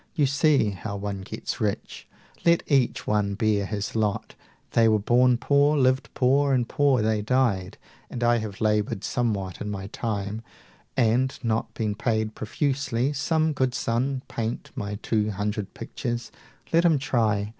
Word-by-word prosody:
You 150 -4 +3
see 140 -5 +3
How 100 +2 -6
one 100 -1 -4
gets 95 - -6
rich! - - -3 0.4
Let 170 0 +4
each 135 -5 +1
one 105 -1 0
bear 105 -2 +1
his 105 0 -4
lot. 105 -2 -1 0.4
They 115 -1 +4
were 110 -1 +4
born 120 +4 +3
poor, 145 +3 +3
lived 130 0 +2
poor, 135 +2 +3
and 120 -2 0
poor 135 -5 +2
they 110 -1 +1
died: 105 -5 0 0.3
And 120 - -4
I 120 0 +4
have 105 -3 -6
labored 105 -2 +1
somewhat 100 -6 -2
in 105 - -3
my 95 -2 -4
time 105 -2 -3 0.6
And 125 +2 +2
not 115 0 -1
been 110 -2 -1
paid 110 -1 -1
profusely. 135 +2 -1
Some 155 +3 +1
good 130 -2 0
son 130 +3 -1
255 - - -15
Paint 115 0 -3
my 100 0 -4
two 110 -2 +1
hundred 105 0 -3
pictures 120 0 -4 0.4
let 165 +1 +5
him 165 -4 +4
try! 110 -7 0
115 Hz, 160 wpm, -25 LUFS, 105-130 Hz, 0.6 s, let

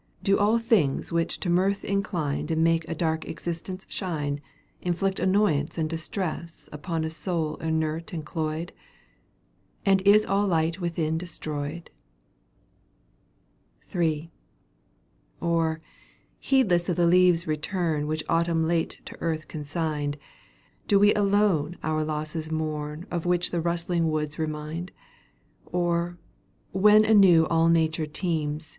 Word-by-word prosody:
Do 195 0 +3
all 210 +3 +4
things 225 - +1
which 165 0 -1
to 180 - -1
mirth 195 +3 +2
incline. 190 -9 -1
And 160 0 +2
make 165 0 +2
a 165 - -2
dark 160 0 -1
existence 175 +2 -5
shine 145 -6 -3 0.4
Inflict 190 +2 -1
annoyance 185 -6 +1
and 160 -1 0
distress 165 +1 -5
• - - -12
Upon 160 +2 -3
Й 160 - -2
soul 160 -1 -2
inert 160 0 -2
and 160 -3 -5
cloyed? 160 +1 -3 0.6
— - - -40
And 195 -1 +4
is 205 +2 +5
all 200 +1 +1
light 165 0 +1
within 160 -2 -1
destroyed? 155 -1 -5 2.0
III. 165 -2 0 1.1
Or, 165 -1 0 0.6
heedless 195 -10 +2
of 175 - +1
the 175 - +3
leaves' 180 -1 +4
return^ 155 -1 -1
Which 155 0 -2
Autumn 165 -1 +1
late 165 -1 -1
to - - -9
earth 160 -2 -2
consigned. 150 -1 -3 0.7
Do 205 - +5
we 205 +1 +6
alone 200 -6 +2
our 155 0 0
losses 155 +1 -4
mourn 155 0 -3
Of 175 0 -2
which 175 0 +1
the 170 - 0
rustling 170 0 0
woods 155 0 -2
remind? 155 +3 -4 0.8
Or, 175 0 -1 0.5
when 210 +3 +6
anew 195 -7 +6
all 165 0 +4
Nature 160 -1 +2
teems. 155 -1 -2
165 Hz, 130 wpm, -26 LUFS, 155-180 Hz, 2.0 s, we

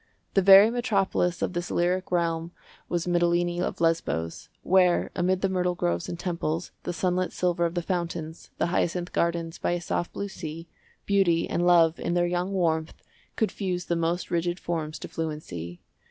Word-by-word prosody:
The 195 - +4
very 195 +3 +8
metropolis 200 -7 0
of - - -1
this 175 0 -3
lyric 180 +2 0
realm 170 -1 0 0.4
was 170 -1 -1
Mitylene 175 0 +1
of - - -3
Lesbos, 165 - -1
where, 180 -1 +3
amid 185 +1 +1
the 195 - +2
myrtle 180 -1 0
groves 85 - -1
and 170 - -4
temples, 170 -2 -2
the - - -1
sunlit 180 +1 0
silver 175 -1 +1
of 170 - -8
the 175 - -1
fountains, 170 -3 -4
the - - +1
hyacinth 175 +1 -1
gardens 170 -1 -1
by - - 0
a 175 - -1
soft 175 0 -2
blue 200 - -3
sea, 165 -3 -7 0.4
Beauty 190 -5 +2
and 175 +1 0
Love 170 -2 +5
in 175 - -1
their 175 0 +3
young 180 +2 -1
warmth 165 -4 -1 0.3
could 220 - 0
fuse 180 -3 -3
the 170 - 0
most 170 +2 -1
rigid 175 +1 0
forms 160 -2 -3
to - - -7
fluency. 150 - -5
175 Hz, 175 wpm, -26 LUFS, 165-180 Hz, 0.4 s, very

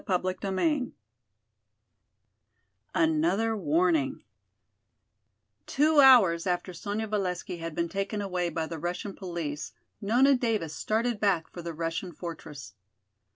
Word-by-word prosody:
CHAPTER 185 +1 -1
VIII 260 - 0 2.0
Another 170 +8 +2
Warning 165 -5 +1 1.4
Two 305 +2 +3
hours 205 -12 +7
after 180 +1 -1
Sonya 205 +5 -3
Valesky 185 -4 -3
had 165 -1 -5
been 170 - 0
taken 195 +4 -3
away 180 -3 -1
by 165 -1 -2
the 160 0 -6
Russian 175 +4 -4
police 165 -6 -5 0.3
Nona 250 +7 +4
Davis 220 -10 -1
started 225 +4 -1
back 195 -6 +1
for 175 - -8
the 170 -1 -6
Russian 165 +2 -3
fortress. 150 -7 -8
185 Hz, 110 wpm, -28 LUFS, 165-215 Hz, 2.0 s, hours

